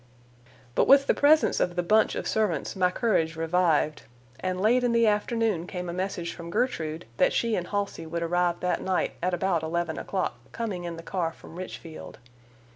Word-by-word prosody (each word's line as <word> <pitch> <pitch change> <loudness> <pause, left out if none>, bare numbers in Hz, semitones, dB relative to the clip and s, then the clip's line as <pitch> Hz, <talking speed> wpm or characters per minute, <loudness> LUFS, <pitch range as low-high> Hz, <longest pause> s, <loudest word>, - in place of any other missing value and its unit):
But - - +2
with 275 0 +7
the - - +3
presence 300 +2 +4
of 175 - 0
the 175 - 0
"bunch" 215 +5 +3
of - - -3
servants 205 -9 0
my 185 -1 +3
courage 180 -6 0
revived, 160 -2 +1 0.4
and 185 0 -2
late 235 +5 +3
in 240 -1 +2
the 230 0 +4
afternoon 210 -4 +1
came 180 -2 -5
a - - -4
message 180 -2 -3
from 170 -1 -9
Gertrude 170 - -1
that - - +3
she 230 -2 +1
and 175 -2 -3
Halsey 200 -5 -3
would 170 +1 -3
arrive 175 0 +1
that 180 - 0
night 190 -1 0
at 180 0 +1
about 180 -2 0
eleven 160 0 -2
o'clock, 185 -11 -2
coming 200 -7 -3
in 170 -1 -5
the 165 - -9
car 170 -3 -2
from 165 - -14
Richfield. 170 -3 -8
180 Hz, 190 wpm, -27 LUFS, 170-210 Hz, 0.4 s, with